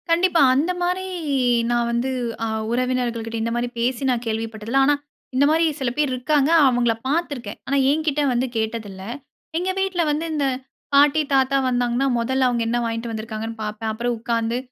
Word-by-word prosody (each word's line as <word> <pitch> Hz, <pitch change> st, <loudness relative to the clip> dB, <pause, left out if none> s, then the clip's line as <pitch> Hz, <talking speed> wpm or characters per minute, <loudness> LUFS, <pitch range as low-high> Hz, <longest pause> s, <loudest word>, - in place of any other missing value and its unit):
கண்டிப்பா. 340 Hz, 0 st, +3 dB
அந்த 310 Hz, +7 st, +2 dB
மாரி 360 Hz, +2 st, 0 dB, 0.7 s
நான் 240 Hz, 0 st, +1 dB
வந்து 235 Hz, +2 st, 0 dB, 0.4 s
அ -, -, -1 dB, 0.2 s
உறவினர்கள் 245 Hz, -2 st, -1 dB
கிட்ட 225 Hz, 0 st, -4 dB
இந்த 230 Hz, +1 st, -1 dB
மாரி 240 Hz, +1 st, 0 dB
பேசி 245 Hz, +2 st, 0 dB
நான் 245 Hz, -2 st, 0 dB
கேள்விப்பட்டதில்ல. 225 Hz, +2 st, -1 dB
ஆனா 290 Hz, +1 st, +4 dB, 0.4 s
இந்த 275 Hz, +2 st, +4 dB
மாரி 325 Hz, +2 st, +3 dB
சில 260 Hz, -3 st, 0 dB
பேர் 295 Hz, -3 st, +1 dB
இருக்காங்க 280 Hz, +3 st, +1 dB, 0.2 s
அவங்கள 245 Hz, -2 st, +2 dB
பாத்துருக்கேன். 285 Hz, -8 st, -2 dB
ஆனா 280 Hz, -, +1 dB
என்கிட்ட 300 Hz, 0 st, +1 dB
வந்து 245 Hz, +2 st, 0 dB
கேட்டதில்ல. 220 Hz, -4 st, -3 dB, 0.5 s
எங்க 360 Hz, +2 st, -1 dB
வீட்டுல 385 Hz, -2 st, 0 dB
வந்து 305 Hz, +3 st, -1 dB
இந்த 295 Hz, -2 st, 0 dB, 0.5 s
பாட்டி 290 Hz, +2 st, +5 dB
தாத்தா 270 Hz, 0 st, +3 dB
வந்தாங்கன்னா 245 Hz, +1 st, +1 dB
முதல்ல 260 Hz, +2 st, +1 dB
அவங்க 240 Hz, -1 st, 0 dB
என்ன 235 Hz, +1 st, 0 dB
வாங்கிட்டு 230 Hz, 0 st, -3 dB
வந்திருக்காங்கன்னு 220 Hz, 0 st, -5 dB
பாப்பேன். 215 Hz, +1 st, -3 dB
அப்புறம் 240 Hz, +2 st, -1 dB
உக்காந்து 230 Hz, 0 st, -1 dB
245 Hz, 165 wpm, -22 LUFS, 230-285 Hz, 0.7 s, பாட்டி